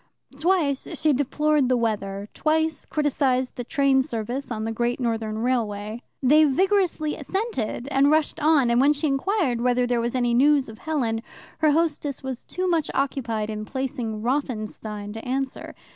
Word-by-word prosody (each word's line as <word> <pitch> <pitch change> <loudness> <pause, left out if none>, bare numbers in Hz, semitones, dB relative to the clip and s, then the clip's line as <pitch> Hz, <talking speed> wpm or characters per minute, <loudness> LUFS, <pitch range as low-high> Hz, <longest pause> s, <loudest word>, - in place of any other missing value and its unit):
Twice 310 -3 +1
she 305 +1 +3
deplored 285 0 +1
the 255 - +3
weather, 205 -3 -2
twice 315 -1 0
criticized 270 -4 0
the 245 - -4
train 275 0 +3
service 245 +3 -4
on 220 -2 -3
the 225 - -2
Great 240 +2 -1
Northern 225 -3 -2
Railway. 220 -2 -2 0.2
They 300 +4 +6
vigorously 340 0 +1
assented, 290 - -3
and 275 +1 +4
rushed 310 0 +2
on, 290 -5 +4
and 240 +1 +4
when 285 +2 +5
she 300 +2 -3
inquired 280 - 0
whether 250 0 +2
there 245 -1 +1
was 235 +2 -2
any 245 -2 +1
news 275 +1 +4
of 220 - -11
Helen, 245 -8 -1 0.4
her 310 - +4
hostess 295 -3 0
was 260 -2 -5
too 370 0 -3
much 330 -4 +1
occupied 230 -6 -1
in 215 0 -4
placing 245 -3 -4
Rothenstein 215 -5 -3
to 225 - -7
answer. 265 +1 -3
260 Hz, 160 wpm, -24 LUFS, 230-300 Hz, 0.4 s, They